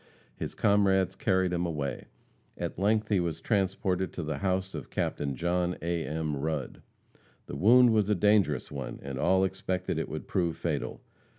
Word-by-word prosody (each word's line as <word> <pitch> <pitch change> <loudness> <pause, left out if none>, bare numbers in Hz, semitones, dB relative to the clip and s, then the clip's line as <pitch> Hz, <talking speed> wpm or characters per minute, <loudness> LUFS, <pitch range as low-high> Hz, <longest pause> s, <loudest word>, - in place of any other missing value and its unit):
His - - -5
comrades 100 -2 +3
carried 95 -1 +1
him 85 0 0
away. 75 -7 -3 0.5
At - - -4
length 105 +2 +2
he 100 -3 +3
was 85 -2 -2
transported 95 -1 0
to 85 - -4
the 75 -2 -3
house 95 0 -1
of - - -6
Captain 70 -2 -2
John 90 +3 0
A. 85 -1 -1
M. 75 -1 -2
Rudd. 75 -2 -3 0.6
The - - -7
wound 120 - +6
was 105 -2 +2
a 105 - +3
dangerous 105 +1 +2
one, 70 -2 -5
and 70 -1 -5
all 95 +5 +3
expected 95 -1 -2
it - - -3
would - - -6
prove 85 -3 0
fatal. - - -3
90 Hz, 170 wpm, -29 LUFS, 80-95 Hz, 0.6 s, wound